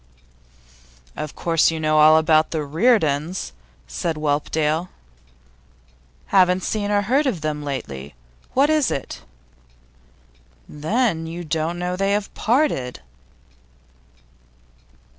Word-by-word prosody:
'Of 150 - -6
course 165 -2 +2
you 165 -1 -3
know 155 0 +2
all 155 +1 +7
about 155 0 +3
the 155 -2 -2
Reardons?' 160 - +1 0.4
said 165 - -3
Whelpdale. 155 +3 -1 1.4
'Haven't 185 -1 +3
seen 205 -2 -2
or 205 0 +2
heard 270 +8 +2
of 195 -11 -2
them 150 -1 -3
lately. 70 - -6 0.4
What 280 +4 +4
is 305 -3 +2
it?' 135 - -5 1.5
'Then 165 - -1
you 170 +2 -6
don't 160 +1 -2
know 180 0 -2
that 180 - -4
they 195 0 +1
have 205 0 -2
parted? 225 - 0
165 Hz, 110 wpm, -22 LUFS, 155-205 Hz, 1.5 s, all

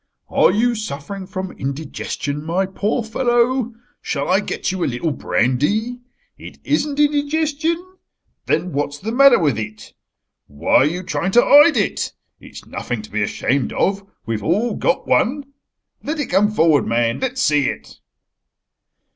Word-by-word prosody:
"Are - - +4
you 240 +3 +2
suffering 195 -2 -6
from 190 -1 -5
indigestion, 140 +1 -4
my 175 +4 0
poor 205 +5 -2
fellow? 240 +1 0 0.3
Shall 140 0 -3
I 185 +1 +4
get 210 - -3
you 185 -2 -3
a - - +1
little 135 +6 -2
brandy? 200 - 0 0.4
It - - -11
isn't 295 -1 -1
indigestion. 315 +4 0 0.5
Then 180 - 0
what's 145 +1 -2
the 215 +9 -5
matter 275 +2 +6
with 145 -9 +1
it? 110 0 -8 0.5
Why 70 +1 -1
are - - +5
you 175 +4 -3
trying 190 +1 -2
to 240 - +6
hide 295 0 +7
it? 205 - -1 0.3
It's - - -12
nothing 120 -3 -5
to 105 - -13
be 110 +1 -1
ashamed 130 +6 -1
of. 200 +1 0 0.2
We've 115 -2 -3
all 210 +9 +1
got - - 0
one. 285 +4 +2 0.6
Let 305 +2 -4
it 290 - -3
come 200 +3 +3
forward 160 - +3
man. 115 0 0
Let's 260 0 -1
see 145 -3 +2
it." - - -9
195 Hz, 155 wpm, -20 LUFS, -, 0.6 s, hide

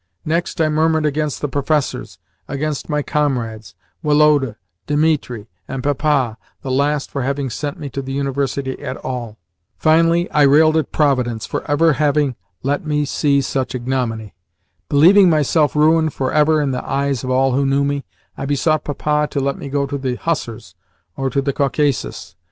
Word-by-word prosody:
Next, 165 +3 -1
I 160 - +3
murmured 155 0 +1
against 150 0 -1
the 145 - 0
professors, 145 +1 -2 0.3
against 145 +2 -3
my 150 -1 0
comrades, 120 -10 -2 0.3
Woloda, 150 -6 +3 0.3
Dimitri, 145 -7 0 0.2
and 135 -1 -5
Papa 145 -5 0 0.2
(the 135 - -3
last 140 +2 0
for 140 - -3
having 135 0 -2
sent 145 +5 -4
me 145 - -5
to 135 - -4
the 135 0 -7
University 140 -1 -2
at 130 - -5
all). 120 -4 -5 0.4
Finally, 165 +2 +3
I 150 - +2
railed 155 +3 +5
at 160 -4 0
Providence 125 -7 +1
for - - -4
ever 155 +2 +3
having 145 -2 +1 0.3
let 140 +2 -1
me 150 -1 0
see 140 0 +1
such 130 -1 -2
ignominy. 120 -4 -3 0.6
Believing 180 +6 +6
myself 155 -1 +2
ruined 155 0 +3
for 130 -1 -2
ever 155 +1 +4
in 140 - -1
the 125 - -3
eyes 140 -2 -1
of 130 - -4
all 130 +1 +2
who 135 +3 +1
knew 140 +1 +2
me, 140 0 -1 0.3
I 135 - -5
besought 155 +2 +1
Papa 150 +1 0
to 140 - -2
let 140 0 -1
me 140 - -6
go 140 0 0
into 140 0 -3
the 130 -2 -2
hussars 120 -8 -4 0.4
or 135 0 -1
to 140 +1 -1
the 140 0 -1
Caucasus. 140 0 -1
140 Hz, 170 wpm, -19 LUFS, 135-150 Hz, 0.6 s, Believing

